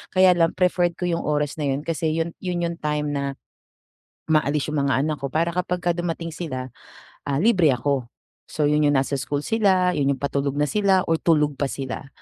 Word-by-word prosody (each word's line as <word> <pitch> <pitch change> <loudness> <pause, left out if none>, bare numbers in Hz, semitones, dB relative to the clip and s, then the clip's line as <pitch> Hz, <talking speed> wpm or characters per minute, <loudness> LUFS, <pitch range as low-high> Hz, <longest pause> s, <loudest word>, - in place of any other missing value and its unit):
kaya 185 0 +7
lang 170 -2 +2
preferred 175 -2 +1
ko - - -7
yung 170 -1 0
oras 150 0 -1
na 145 - -1
yun 140 +1 -1
kasi 160 -1 -1
yun 165 +1 -1
yun 180 -2 -2
yung 170 0 -2
time 150 -1 -1
na 140 -1 -2 1.0
umaalis 150 -1 +1
yung 145 -2 0
mga 135 -1 +2
anak 155 0 -1
ko, 140 - -4
para 165 +2 +2
kapagka 175 0 -1
dumating 170 -1 -3
sila, 130 -6 -5 0.6
ah, 140 +3 0
libre 180 - +4
ako. 130 0 -1 0.4
So, 155 - -2
yun 150 0 +3
yung 145 - +2
nasa 135 +1 0
school 145 +2 -3
sila, 190 -4 +2
yun 140 -4 +1
yung 135 - -18
patulog 140 0 -1
na 145 - +1
sila, 195 -3 +3
or 165 - +2
tulog 150 -4 +2
pa 140 - +1
sila. 135 0 -5
155 Hz, 200 wpm, -23 LUFS, 140-175 Hz, 1.0 s, kaya